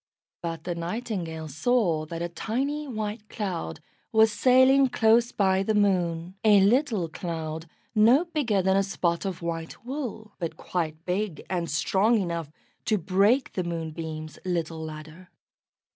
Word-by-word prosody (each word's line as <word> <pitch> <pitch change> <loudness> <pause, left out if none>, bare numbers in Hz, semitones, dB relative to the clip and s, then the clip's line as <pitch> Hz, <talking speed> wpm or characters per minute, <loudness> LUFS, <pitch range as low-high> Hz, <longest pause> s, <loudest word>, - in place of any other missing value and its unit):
But 165 -2 -4
the 175 - -2
Nightingale 170 -3 -4
saw 160 - +1
that 165 +1 -4
a - - -1
tiny 270 - -2
white 215 -3 -4
cloud 185 -7 -4 0.3
was 220 -1 +5
sailing 260 +4 +5
close 230 +1 +3
by 190 -1 +2
the 215 +2 0
Moon 180 -4 +1
a 210 -2 +7
little 220 - +3
cloud 160 -1 -5 0.3
no 235 +9 +5
bigger 255 - 0
than 190 +1 +3
a 195 - +4
spot 175 -2 -1
of 185 -3 -4
white 165 +5 -5
wool, 240 -6 -5
but 170 -3 -4
quite 160 -2 -3
big 185 -2 -2
and 170 -3 -1
strong 195 +10 +2
enough 170 -5 -3 0.4
to 215 - +2
break 200 - +2
the 185 - -1
Moonbeam's 160 -2 -5
little 165 -3 -2
ladder. 155 +3 -9
190 Hz, 145 wpm, -26 LUFS, 165-220 Hz, 0.4 s, a